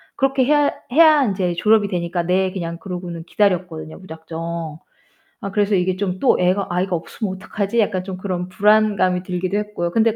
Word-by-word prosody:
그렇게 270 -1 +2
해야 290 +1 +3 0.2
해야 310 -1 +6
인제 190 -5 0
졸업이 215 +2 +3
되니까 175 -2 -2
"네." 185 +2 +1
그냥 170 -3 -5
그러고는 175 -2 -6
기다렸거든요, 175 -5 -1
무작정. 165 -2 -6 0.6
아 200 - -5
그래서 205 0 +1
이게 185 0 +1
좀 185 -1 -3
또 270 - +3
애가 185 +2 +1
아이가 180 +1 0
없으면 185 +4 -4
어떡하지 210 +3 -2
약간 195 -4 +1
좀 190 -1 -6
그런 185 -2 -4
불안감이 205 -3 +3
들기도 185 +1 -2
했고요. 210 -5 -3
근데 225 +2 +2
185 Hz, 400 characters per minute, -20 LUFS, 175-210 Hz, 0.6 s, 해야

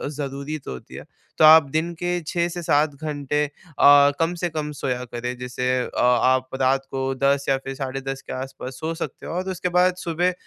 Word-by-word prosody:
ज़रूरी 140 +1 -4
तो - - -5
होती 65 - -10
है। - - -9 0.3
तो 155 - +6
आप 155 -2 +8
दिन 160 +2 0
के 175 0 -1
6-7 170 -4 +1
घंटे 150 -1 -2
अ, 145 -2 +4
कम 165 +1 +1
से 175 - 0
कम 150 -1 -4
सोया 125 -3 -3
करें। 125 +1 -4
जैसे 125 0 -3
अ, - - -4
आप 130 +1 +3
रात 135 +1 +2
को 135 0 -1
10 140 +1 +1
या 135 - +3
फिर 135 0 -7
साढ़े 135 0 -4
10 135 0 -5
के - - -8
आस-पास 130 0 -6
सो 160 +1 -3
सकते - - -6
हो। - - -5
और 185 +2 -3
उसके 180 0 -2
बाद 180 0 +4
सुबह, 175 +1 0
145 Hz, 200 wpm, -23 LUFS, 135-160 Hz, 0.3 s, आप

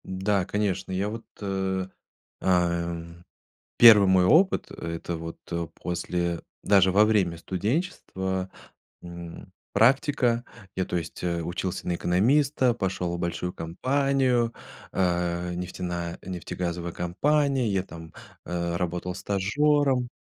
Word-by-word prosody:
Да, 95 0 0
конечно. 100 -2 -1
Я 95 +2 -1
вот, 115 +1 -7 0.2
э, 95 -1 -1 0.5
эм, 85 -1 -1 0.5
1 105 -4 +9
мой 95 -1 +5
опыт, 180 - +4
это 85 +1 -5
вот, 80 0 -7
э, 85 -1 -2
после 85 -1 -2 0.2
даже 95 -2 +5
во 100 +3 +5
время 100 -6 +2
студенчества, 95 - -2 0.5
м, 85 -1 -9 0.2
практика. 125 -1 +3 0.3
Я 95 - +1
то - - -3
есть, 85 -2 -5
э, 85 -1 0
учился 90 +2 -4
на 90 - +1
экономиста, 125 - +2
пошел 95 -5 -2
в - - -8
большую 85 +1 -2
компанию, 130 - +1 0.4
а, 90 -1 0
нефтеная 85 -1 -4
нефтегазовая 85 -1 -4
компания, 135 - +1
я 95 -2 +1
там, 80 -3 -11 0.3
э, 85 -1 -2
работал 90 +1 -3
стажёром. 125 +7 +1
95 Hz, 115 wpm, -26 LUFS, 85-110 Hz, 0.5 s, 1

